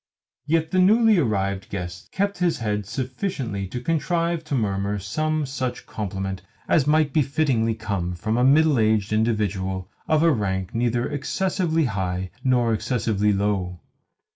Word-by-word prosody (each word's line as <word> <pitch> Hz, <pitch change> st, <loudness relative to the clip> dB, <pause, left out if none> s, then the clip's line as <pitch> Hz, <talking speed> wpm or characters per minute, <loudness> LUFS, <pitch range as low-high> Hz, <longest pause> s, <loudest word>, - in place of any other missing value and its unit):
Yet 160 Hz, +1 st, +1 dB
the 185 Hz, -, +2 dB
newly 215 Hz, +2 st, +5 dB
arrived 100 Hz, -7 st, -1 dB
guest 90 Hz, -3 st, -6 dB
kept 200 Hz, -1 st, -1 dB
his 175 Hz, -2 st, +1 dB
head 105 Hz, -3 st, -2 dB
sufficiently 125 Hz, -, -3 dB
to 125 Hz, +6 st, -5 dB
contrive 165 Hz, +3 st, 0 dB
to 150 Hz, -, -2 dB
murmur 100 Hz, -3 st, -1 dB
some 155 Hz, +10 st, -1 dB
such 130 Hz, -2 st, -4 dB
compliment 95 Hz, -2 st, -4 dB, 0.3 s
as 145 Hz, -4 st, +3 dB
might 150 Hz, -2 st, +3 dB
fittingly 135 Hz, -6 st, +1 dB
come 100 Hz, -5 st, -3 dB
from 110 Hz, +6 st, -2 dB
a 125 Hz, -, +2 dB
middle 145 Hz, 0 st, +5 dB
aged 110 Hz, -1 st, +2 dB
individual 100 Hz, -4 st, -1 dB, 0.2 s
of 155 Hz, 0 st, +3 dB
a 165 Hz, -, +5 dB
rank 95 Hz, -, -1 dB
neither 120 Hz, +1 st, 0 dB
excessively 165 Hz, +2 st, 0 dB
high 95 Hz, -4 st, -2 dB
nor 125 Hz, -3 st, +2 dB
excessively 105 Hz, -2 st, 0 dB
low. 95 Hz, -3 st, -1 dB
115 Hz, 140 wpm, -24 LUFS, 100-155 Hz, 0.3 s, newly